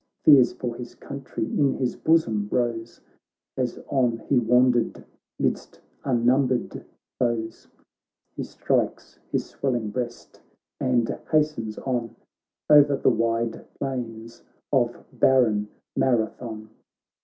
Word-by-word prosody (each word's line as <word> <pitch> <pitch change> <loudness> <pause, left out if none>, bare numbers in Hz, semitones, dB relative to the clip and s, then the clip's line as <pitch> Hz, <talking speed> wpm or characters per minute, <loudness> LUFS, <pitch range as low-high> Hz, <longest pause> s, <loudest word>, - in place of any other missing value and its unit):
Fears 135 -5 +7
for 120 -2 -4
his 120 0 -9
country 140 -5 -5
in 140 +3 +1
his 125 -2 -1
bosom 115 -11 +2
rose 120 -2 -2 0.5
As 125 -2 -2
on 125 -4 +1
he 135 - +4
wandered 125 +1 +2 0.3
midst - - -2 0.2
unnumbered 125 0 +1 0.4
foes; 115 -2 -2 0.7
He - - -4
strikeshis - - -2
swelling 120 -6 -2
breastand 120 0 -3
hastens 150 -9 0
on 120 -3 -3 0.5
O'er 145 -2 +6
the - - +3
wide 115 0 -1
plains 115 -3 -5 0.3
of 120 -3 +1
barren 110 -6 +3 0.3
Marathon. 110 -2 -1
120 Hz, 95 wpm, -25 LUFS, 115-130 Hz, 0.7 s, Fears